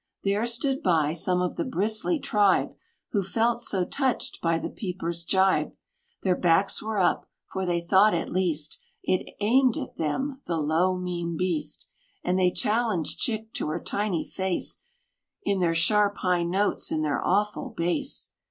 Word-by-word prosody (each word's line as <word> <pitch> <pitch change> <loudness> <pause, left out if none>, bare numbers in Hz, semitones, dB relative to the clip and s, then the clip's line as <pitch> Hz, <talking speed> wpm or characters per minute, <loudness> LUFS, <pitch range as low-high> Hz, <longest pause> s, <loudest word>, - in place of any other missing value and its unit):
There 205 +4 +1
stood 265 +3 +1
by, 160 -4 +2
some 180 +1 +1
of 180 - -3
the - - 0
bristly 220 - +1
tribe, 205 -8 +2 0.4
Who 205 - +1
felt 230 +5 0
so 190 -6 +1
touched 265 +2 -1
by 165 -1 +2
the - - -4
peeper's 170 -4 -4
gibe, 190 +1 +2 0.5
Their 185 -2 +3
backs 175 +3 +2
were 220 0 -3
up; 185 - +2 0.2
for 190 -1 -2
they 170 -1 +1
thought, 190 +4 +4
at 165 - -3
least, 165 -5 -1 0.2
It 185 - -1
aimed 245 +4 +3
at - - -6
them 265 - -2
the 170 - 0
low, 165 +5 +1
mean 175 -2 -3
beast: 155 -4 -1 0.4
And 180 +1 +1
they 180 -1 +4
challenged 210 -4 0
Chick 220 -1 -2
to - - -2
her 155 +3 -2
tiny 200 -4 -1
face, 190 -1 -2 0.6
In 200 - 0
their 170 -2 +2
sharp, 205 +4 +3
high 180 -2 +1
notes, 195 +4 0
and 155 -1 0
their 145 - -1
awful 210 +7 0
base. 225 +6 0
185 Hz, 160 wpm, -26 LUFS, 170-215 Hz, 0.6 s, thought